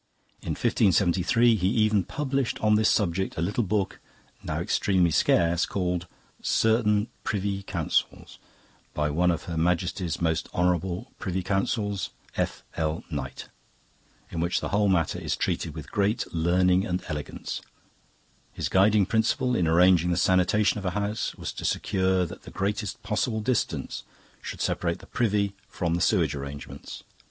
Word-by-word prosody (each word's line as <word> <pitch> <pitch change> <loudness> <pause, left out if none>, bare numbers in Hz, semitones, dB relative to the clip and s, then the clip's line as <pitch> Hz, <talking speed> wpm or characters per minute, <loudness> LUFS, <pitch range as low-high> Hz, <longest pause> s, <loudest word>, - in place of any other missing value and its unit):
In - - -3
1573 100 +5 +3
he 90 -3 +1
even 110 -2 +3
published, 135 - -2
on 105 0 +3
this 110 0 +4
subject, 95 -1 0
a - - -1
little 105 +7 0
book 100 0 -1 0.4
now - - -3
extremely 90 -4 +2
scarce 85 +2 +3
called, 90 -2 -2 0.3
'Certaine 110 -1 +2 0.2
Priuy 100 -2 -2
Counsels' - - -2 0.6
by 75 0 0
'One 90 +4 +2
of 85 -3 0
Her 85 -2 -5
Maiestie's 85 0 0
Most 80 -1 0
Honourable 90 +5 0
Priuy 95 -1 -3
Counsels, 100 -1 -1 0.3
F.L. 80 0 -2
Knight', - - -5 0.8
in 85 - -4
which 85 +2 +1
the - - -4
whole 105 0 +2
matter 85 -4 +1
is - - -2
treated 80 -3 -2
with 80 - -8
great 105 +3 +1
learning 90 +2 +3
and 90 0 -2
elegance. 75 -3 -5 0.9
His - - -3
guiding 100 +1 +4
principle 115 +4 +1
in 90 -6 +2
arranging 90 +1 +5
the 85 - +1
sanitation 95 +4 +3
of 100 - -8
a 90 +1 -1
house 105 +2 -2
was - - -5
to - - -7
secure 95 -1 +1
that - - -9
the - - -11
greatest 100 +1 -3
possible 110 +1 -1
distance 120 +2 -1 0.4
should - - -6
separate 85 -1 0
the - - -14
privy 105 -4 0
from 85 -2 -2
the 85 - 0
sewage 85 -9 +2
arrangements. 70 0 -8
95 Hz, 145 wpm, -26 LUFS, 85-105 Hz, 0.9 s, arranging